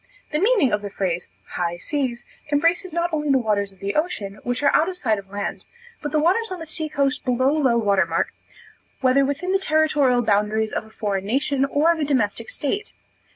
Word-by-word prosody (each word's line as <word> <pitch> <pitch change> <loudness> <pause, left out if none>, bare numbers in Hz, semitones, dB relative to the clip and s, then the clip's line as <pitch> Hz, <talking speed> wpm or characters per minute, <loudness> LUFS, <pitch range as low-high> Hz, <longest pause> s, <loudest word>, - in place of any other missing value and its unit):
The 300 - 0
meaning 400 - +3
of 210 - +1
the 205 - -5
phrase 180 -3 -2 0.3
"high 175 -1 -1
seas," 250 - -3 0.3
embraces 335 +5 +2
not 340 +1 -1
only 300 -1 -1
the 275 - +5
waters 210 -4 0
of 195 - -21
the 195 +2 -3
ocean, 215 - -2
which 245 +3 -2
are 285 - +4
out 330 - +3
of 365 - -6
sight 220 - +1
of 195 -1 -13
land, 200 0 -4 0.4
but 295 - -4
the 310 - +1
waters 375 +8 +2
on 370 - -3
the 325 - -7
sea 315 0 -2
coast 280 -1 0
below 255 +1 +2
low 270 -6 +2
water 200 -5 +2
mark, 165 +1 -1 0.7
whether 265 +1 +4
within 285 +7 -1
the 390 - +3
territorial 295 -7 +2
boundaries 215 +1 +1
of - - -2
a - - -16
foreign 200 -3 -3
nation, 275 +3 +1
or 295 +4 +3
of 335 - -1
a - - +1
domestic 230 -6 0
state. 400 +9 -2
270 Hz, 210 wpm, -23 LUFS, 210-310 Hz, 0.7 s, the